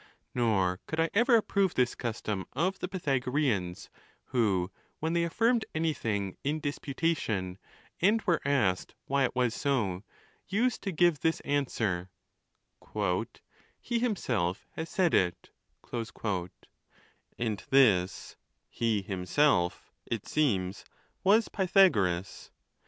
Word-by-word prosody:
Nor 95 -7 +1
could 160 - -3
I 165 0 +2
ever 235 +4 +5
approve 200 -4 +2
this 125 -1 +2
custom 105 -5 -3
of 185 +3 0
the - - -3
Pythagoreans, 135 - -1 0.3
who, 100 -7 +1 0.3
when 160 +1 -1
they 170 0 +2
affirmed 225 +7 +2
anything 115 - -1
in 150 +3 0
dispu 145 -2 -4
tation, 105 - -1 0.4
and 210 +5 +4
were 175 -5 +2
asked 120 -10 +1
why 140 0 +2
it 125 - -3
was 125 -2 +2
so, 115 -12 0 0.5
used 235 +4 +1
to 195 - -3
give 175 -3 +3
this 160 +4 +1
an 145 0 +1
swer: 95 -6 -2 1.7
"He 235 -1 -1
himself 120 - -1
has 160 +1 -5
said 180 -3 +1
it;" 90 -2 +1 1.9
and 110 -4 -2
this 105 -9 +3 0.2
" - - -50
he 110 -4 0
himself," 95 +1 +1 0.2
it 115 -4 -3
seems, 100 -11 0 0.4
was 215 +4 +5
Pythagoras. 115 - +2
135 Hz, 120 wpm, -30 LUFS, -, 1.9 s, ever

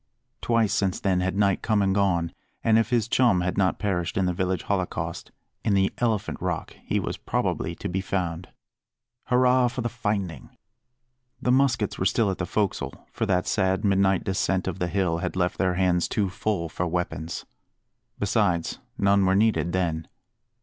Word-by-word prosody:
Twice 115 -3 +2
since 95 -2 0
then 95 -2 +1
had 95 +1 -1
night 100 -2 +2
come 110 -2 +1
and 95 -1 +2
gone; 95 -4 +1 0.3
and 110 0 +5
if 115 0 0
his 120 -3 +1
chum 115 -7 +3
had 90 0 -1
not 95 -1 +2
perished 90 -5 -1
in 95 - +2
the 90 - +1
village 90 0 -1
holocaust, 95 -3 -3 0.3
in 105 -3 +2
the 95 0 +2
Elephant 115 -4 -1
Rock - - -3
he - - 0
was - - -3
probably - - -2
to - - -5
be 95 +2 -1
found. 90 -2 -3 0.8
Hurrah 125 0 +4
for 125 +1 -3
the 120 - -1
finding! 105 -7 -3 0.8
The 125 - +1
muskets 125 -5 +2
were 95 - +3
still 100 +1 +2
at 95 - -5
the 90 - -1
"fo'csle," 105 -3 -1
for 115 - -2
that 90 -2 +1
sad 95 +1 +1
midnight 95 -1 +3
descent 95 -1 0
of - - -3
the 90 - 0
hill 90 -2 0
had - - -3
left 90 -1 0
their 90 -1 +2
hands 90 -1 +2
too 100 -3 -1
full 100 -4 -1
for 85 +2 -3
weapons. 85 -2 -3 0.7
Besides, 100 -5 0 0.2
none 100 0 +3
were 95 0 +3
needed 105 -4 +2
then. 85 -3 -1
95 Hz, 175 wpm, -25 LUFS, 90-105 Hz, 0.8 s, and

